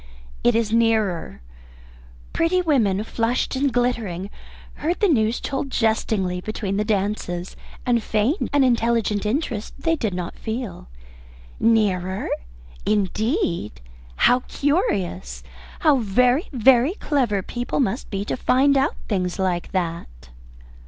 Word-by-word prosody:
"It 240 -1 +4
is 225 -2 +1
nearer," 215 - +1 0.9
Pretty 330 +3 +2
women, 230 - +2
flushed 230 +4 -1
and 275 +1 +1
glittering, 225 -6 -1 0.5
heard 330 +4 -1
the 415 - +4
news 230 - +2
told 275 0 -3
jestingly 215 -6 0
between 200 -1 -3
the 210 - +1
dances, 195 -4 -2 0.3
and 240 -2 +2
feigned 220 - 0
an 285 -1 +4
intelligent 230 -4 +1
interest 230 -3 -2
they 330 -1 +1
did 220 - -2
not 180 -1 -4
feel. 220 - -5 0.7
"Nearer! 195 -4 +1 0.5
Indeed. 210 - 0 0.4
How 250 - +4
curious! 190 - -1 0.4
How 300 -3 +5
very, 250 - +2
very 260 - +4
clever 245 - 0
people 240 +7 -3
must 240 -2 -1
be 200 0 -3
to - - -2
find 270 +3 +3
out 275 +2 +2
things 180 -4 -1
like 185 -3 -1
that!" 165 - -4
225 Hz, 120 wpm, -22 LUFS, 195-255 Hz, 0.9 s, How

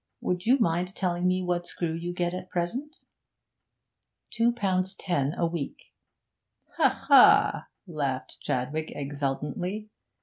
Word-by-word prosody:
Would 180 +3 -2
you 260 +3 +6
mind 180 -3 0
telling 180 -1 0
me 185 0 +1
what 175 -1 -1
screw 170 -2 -2
you 170 +2 -4
get 175 0 -1
at 185 0 -6
present?' 245 - -3 1.4
'Two 235 +1 +2
pounds 190 -5 0
ten 150 -5 -1
a 170 - +1
week.' 165 -4 -5 0.8
'Ha, - - +5 0.2
ha!' - - +6 0.2
laughed 140 -6 -3
Chadwick 150 +5 -2
exultantly. 150 +9 -3
175 Hz, 125 wpm, -27 LUFS, 155-185 Hz, 1.4 s, you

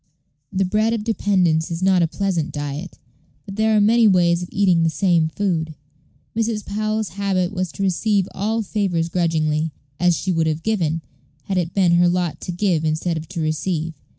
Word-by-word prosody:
The 195 -1 +1
bread 215 +4 +1
of 225 -2 -2
dependence 185 -7 +1
is 170 +1 -4
not 190 -1 +4
a 170 - +3
pleasant 180 -3 -2
diet, 145 +4 -5 0.5
but 195 -2 -8
there 220 0 +2
are - - +5
many 225 +2 +5
ways 175 -3 +3
of 180 - -6
eating 185 -4 +3
the 165 - +3
same 165 0 +2
food. 160 -4 -2 0.6
Mrs. 225 -1 -1
Powell's 215 +1 -2
habit 190 0 -1
was 185 -3 -2
to 195 - -4
receive 195 +1 +1
all 220 +3 -1
favors 185 -6 -1
grudgingly, 160 -2 0 0.3
as 175 -1 +3
she 185 - -2
would 165 -2 +1
have 155 +1 -2
given, 165 -7 0 0.4
had 190 -2 -1
it 170 -1 -3
been 185 -3 +4
her 175 0 +4
lot 175 -2 -1
to - - -4
give 175 -3 0
instead 160 +2 0
of 160 0 -5
to 180 -3 -5
receive. 160 +1 -1
180 Hz, 185 wpm, -21 LUFS, 165-200 Hz, 0.6 s, are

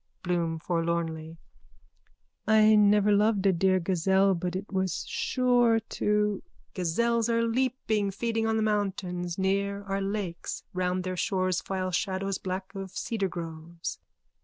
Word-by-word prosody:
BLOOM: 170 -2 0
(Forlornly.) 165 -1 -2 1.1
I 220 0 +6
never 210 0 +5
loved 205 -1 +3
a 195 - +5
dear 185 +2 +3
gazelle 190 +2 +2
but 180 0 -3
it 200 +2 -5
was 190 -2 -1
sure 245 -3 +2
to... 210 -1 0 0.3
_(Gazelles 230 +6 +1
are 230 0 +2
leaping, 230 -3 0
feeding 225 +3 -1
on 220 0 +1
the 220 - +1
mountains. 190 -4 -1
Near 200 +1 0
are 195 0 -2
lakes. 195 -3 -4
Round 185 0 -1
their 185 0 -3
shores 185 -2 0
file 185 -1 -3
shadows 190 +1 -1
black 185 +1 -5
of 195 -2 -7
cedargroves. 170 -6 -4
195 Hz, 130 wpm, -28 LUFS, 180-210 Hz, 1.1 s, I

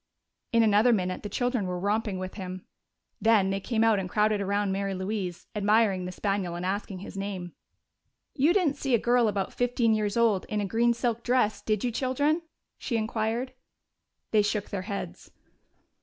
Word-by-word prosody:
In 230 -1 +4
another 215 +3 +5
minute 185 -4 0
the 205 - -6
children 245 -2 -1
were 180 0 -2
romping 205 +2 -1
with 185 0 -5
him. 185 -2 -7 0.6
Then 215 -4 +4
they 195 - -1
came 220 +2 0
out 225 -3 +4
and 185 -1 -4
crowded 210 +1 +2
around 200 0 0
Mary 195 0 -2
Louise, 185 -2 -4
admiring 210 -2 +2
the 180 - -4
spaniel 195 -2 -2
and 175 +1 -4
asking 195 -1 -3
his - - -9
name. 195 -3 -5 0.8
"You 290 +4 +3
didn't 345 -7 +2
see 270 -3 +1
a - - +2
girl 240 0 +3
about 200 -2 -2
fifteen 245 -2 +1
years 210 0 0
old 225 -5 +3
in 210 - -2
a 205 - -1
green 235 +4 +2
silk 235 -1 -1
dress, 245 -3 +1
did 215 -2 -1
you, 245 - 0
children?" 285 +7 +1 0.4
she 235 - -1
inquired. 225 +3 -2 0.8
They 215 - +5
shook 205 0 -2
their 195 - -2
heads. 200 - -5
210 Hz, 180 wpm, -27 LUFS, 195-235 Hz, 0.8 s, another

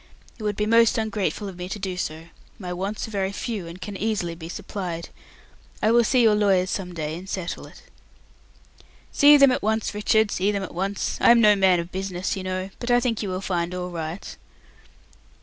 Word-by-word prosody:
"It - - -10
would 210 -1 -1
be 210 - 0
most 230 +1 +4
ungrateful 215 -2 -2
of 190 -2 -8
me 180 0 -6
to 205 - -4
do 190 -2 -4
so. 165 -2 -5 0.3
My 180 -3 -5
wants 195 +5 -3
are - - -10
very 195 -2 -1
few, 205 -3 -4
and 170 +2 -9
can 200 +2 -7
easily 200 -4 -1
be 165 0 -9
supplied. 180 -3 -5 0.7
I 215 - +2
will 235 0 +5
see 245 +2 +3
your 220 -2 +5
lawyers 195 -3 +2
some 180 -3 -4
day, 155 -1 -3
and 190 +1 -11
settle 185 -3 -4
it." - - -16 1.3
"See 290 +1 +7
them 275 -2 +6
at 255 - 0
once, 220 0 0
Richard; 210 0 +2
see 195 +3 +1
them 200 -1 -2
at - - -7
once. 195 +3 -2
I - - +6
am 235 0 +7
no 210 -2 +6
man 190 -3 +4
of 170 +1 -5
business, 185 -1 -3
you 195 - -4
know, 185 +1 -4
but 240 - -5
I 245 0 +5
think 240 -3 -1
you 205 - -3
will 185 0 -3
find 175 -2 -2
all 180 0 -4
right." 165 +2 -6
195 Hz, 215 wpm, -24 LUFS, 180-215 Hz, 1.3 s, See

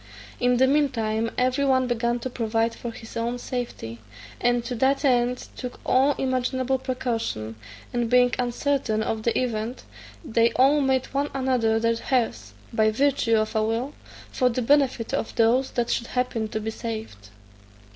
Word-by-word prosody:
In 245 0 +3
the 260 - +5
mean 290 +1 +3
time 225 -2 -1
every 255 +2 +2
one 260 -2 +3
began 240 0 0
to 260 - -3
provide 225 -1 0
for 235 - -6
his 225 -1 -10
own 235 +1 -1
safety, 240 - -5 0.4
and 240 0 +1
to 245 - -3
that 270 +4 +1
end 250 -1 +2
took 250 -1 -7
all 270 +3 +4
imaginable 260 0 0
precaution; 230 - -3 0.4
and 240 -1 0
being 245 0 +4
uncertain 245 -2 0
of 220 0 -2
the 230 +1 +1
event, 235 0 -3 0.4
they 230 -3 +3
all 275 +4 +4
made 265 -1 +2
one 285 +1 0
another 250 -4 +1
their 230 0 +1
heirs, 115 - 0 0.2
by 220 -1 +3
virtue 250 -1 +2
of 215 +1 0
a 215 - +2
will, 230 +6 -1 0.4
for 255 -2 +2
the 250 +1 -2
benefit 265 -3 +2
of - - -2
those 240 +3 +3
that 240 -1 -1
should 235 - -1
happen 250 -3 -1
to 215 - -3
be 220 +1 -3
saved. 220 - -6
240 Hz, 165 wpm, -25 LUFS, 225-260 Hz, 0.4 s, the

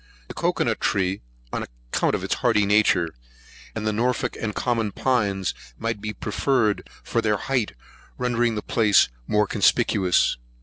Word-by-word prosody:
The - - -6
cocoa - - 0
nut - - -1
tree, 95 -1 0 0.3
on - - -1
account - - -2
of - - -4
its 95 - 0
hardy 115 -5 +2
nature, 100 -5 +3 0.7
and 105 - -3
the 110 - +1
Norfolk 120 +4 0
and 105 -2 -4
common 115 -4 0
pines, 100 -7 0 0.2
might 110 -2 -3
be 105 0 -3
preferred, 110 -2 0
from 115 - 0
their 105 -2 +1
height 125 -3 -1 0.4
rendering 120 -2 +1
the 105 - -3
place 105 -4 +4 0.2
more 105 0 +3
conspicuous. 100 -3 +2
105 Hz, 150 wpm, -24 LUFS, 100-120 Hz, 0.7 s, place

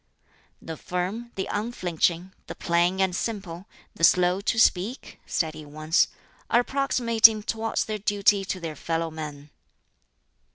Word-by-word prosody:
"The 160 -1 -8
firm, 195 +7 -4
the 190 - -2
unflinching, 185 -4 -1
the - - -7
plain 175 +2 +1
and 190 -2 +1
simple, 195 -5 -5 0.3
the - - -9
slow 180 +2 +4
to 220 +3 -1
speak," 220 +3 +1
said 160 -2 -1
he 155 0 -10
once, 155 +2 +1 0.4
"are 240 - +4
approximating 230 -5 +3
towards 225 +1 -2
their 215 -1 -4
duty 200 0 +2
to 185 - -3
their 165 -3 -6
fellow 165 +2 -2
men." 150 -2 -8
185 Hz, 135 wpm, -25 LUFS, 165-215 Hz, 0.4 s, slow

